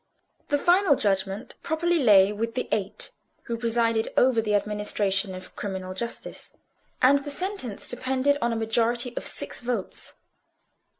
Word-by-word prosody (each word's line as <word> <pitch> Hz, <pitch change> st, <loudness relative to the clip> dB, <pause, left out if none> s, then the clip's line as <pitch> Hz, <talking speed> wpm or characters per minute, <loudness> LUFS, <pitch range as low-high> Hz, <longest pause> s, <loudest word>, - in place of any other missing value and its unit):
The 290 Hz, -, +3 dB
final 350 Hz, 0 st, +4 dB
judgment 195 Hz, 0 st, -1 dB
properly 340 Hz, +2 st, +1 dB
lay 205 Hz, -6 st, +6 dB
with 230 Hz, +3 st, -3 dB
the 250 Hz, -, -2 dB
Eight, 200 Hz, -2 st, -2 dB, 0.3 s
who 235 Hz, -, -3 dB
presided 230 Hz, -1 st, +1 dB
over 245 Hz, -3 st, +4 dB
the 210 Hz, -1 st, +1 dB
administration 205 Hz, -2 st, 0 dB
of 185 Hz, 0 st, -11 dB
criminal 190 Hz, -2 st, -4 dB
justice; 235 Hz, +5 st, -6 dB, 0.5 s
and 280 Hz, +2 st, +6 dB
the 290 Hz, -, -5 dB
sentence 325 Hz, -, -3 dB
depended 260 Hz, +3 st, +1 dB
on 235 Hz, -, +1 dB
a -, -, -1 dB
majority 235 Hz, +2 st, 0 dB
of -, -, -3 dB
six -, -, -2 dB
votes. 240 Hz, -5 st, -3 dB
230 Hz, 140 wpm, -26 LUFS, 205-260 Hz, 0.5 s, lay